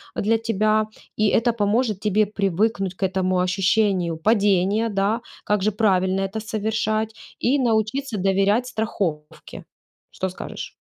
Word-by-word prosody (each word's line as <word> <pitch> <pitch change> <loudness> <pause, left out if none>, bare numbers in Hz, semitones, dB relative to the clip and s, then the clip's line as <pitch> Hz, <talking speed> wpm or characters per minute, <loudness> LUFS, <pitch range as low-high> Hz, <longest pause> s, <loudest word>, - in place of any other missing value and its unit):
для 225 +2 +2
тебя, 215 -1 +1 0.3
и 215 - +3
это 235 +3 +2
поможет 215 -1 0
тебе 210 0 +2
привыкнуть 195 -1 -1
к 195 - -6
этому 185 -1 +1
ощущению 185 -2 +1
падения, 205 +2 +2
да, 205 +3 0 0.2
как 210 -2 +1
же 215 - +2
правильно 190 -2 +1
это 195 +3 -3
совершать, 220 0 -1 0.3
и 270 +4 +2
научиться 230 +1 0
доверять 195 +5 +2
страховке. 190 -10 -4 0.5
Что 190 - -2
скажешь? 185 - -7
210 Hz, 125 wpm, -23 LUFS, 190-220 Hz, 0.5 s, и